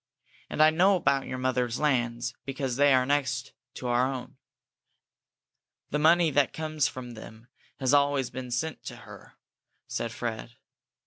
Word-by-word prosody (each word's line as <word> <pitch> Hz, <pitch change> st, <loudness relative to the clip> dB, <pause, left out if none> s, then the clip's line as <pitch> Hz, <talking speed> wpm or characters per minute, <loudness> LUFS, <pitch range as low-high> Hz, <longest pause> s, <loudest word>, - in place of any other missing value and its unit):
And 155 Hz, -, +3 dB
I 155 Hz, -, +6 dB
know 185 Hz, +5 st, +4 dB
about 140 Hz, -6 st, +1 dB
your 130 Hz, -, -4 dB
mother's 125 Hz, -2 st, -1 dB
lands, 120 Hz, -4 st, 0 dB
because 135 Hz, -2 st, -3 dB
they 145 Hz, +1 st, +4 dB
are 130 Hz, -1 st, +4 dB
next 130 Hz, -3 st, -1 dB, 0.2 s
to -, -, -8 dB
our 125 Hz, +2 st, +2 dB
own." 130 Hz, 0 st, -7 dB, 1.5 s
"The 150 Hz, -, 0 dB
money 165 Hz, +1 st, +4 dB
that 145 Hz, 0 st, +2 dB
comes 155 Hz, -2 st, 0 dB
from 125 Hz, -1 st, -7 dB
them 110 Hz, +1 st, -12 dB, 0.3 s
has 130 Hz, 0 st, +1 dB
always 140 Hz, -2 st, +2 dB
been 130 Hz, -1 st, -6 dB
sent 130 Hz, +6 st, -3 dB
to -, -, -6 dB
her," -, -, -13 dB, 0.5 s
said 115 Hz, -, -3 dB
Fred. 115 Hz, 0 st, -5 dB
130 Hz, 150 wpm, -28 LUFS, 120-145 Hz, 1.5 s, I